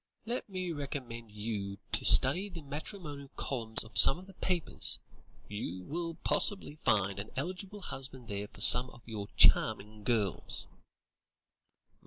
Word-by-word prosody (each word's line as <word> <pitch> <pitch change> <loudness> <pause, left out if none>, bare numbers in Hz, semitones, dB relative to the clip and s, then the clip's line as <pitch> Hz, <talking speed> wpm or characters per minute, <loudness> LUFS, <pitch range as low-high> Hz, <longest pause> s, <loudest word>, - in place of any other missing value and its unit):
"Let 235 -1 -5
me 185 -2 -5
recommend 130 -7 -7
you 105 -2 -5
to - - +1
study 175 +10 +5
the 170 -4 -10
matrimonial 145 -1 -7
columns 115 -4 -2
of 110 - -1
some 135 - +11
of 185 - -13
the 195 - -16
papers. 180 -4 -3 0.5
You 95 -3 -6
will 165 - -5
possibly 195 -7 0
find 100 -1 +1
an 100 - -7
eligible 185 +7 -6
husband 130 -5 -5
there 100 -1 -5
for - - -14
some 125 +1 +8
of 120 - -17
your 105 -3 -7
charming 105 +1 +3
girls." 110 -4 -1
130 Hz, 140 wpm, -31 LUFS, 105-170 Hz, 0.5 s, some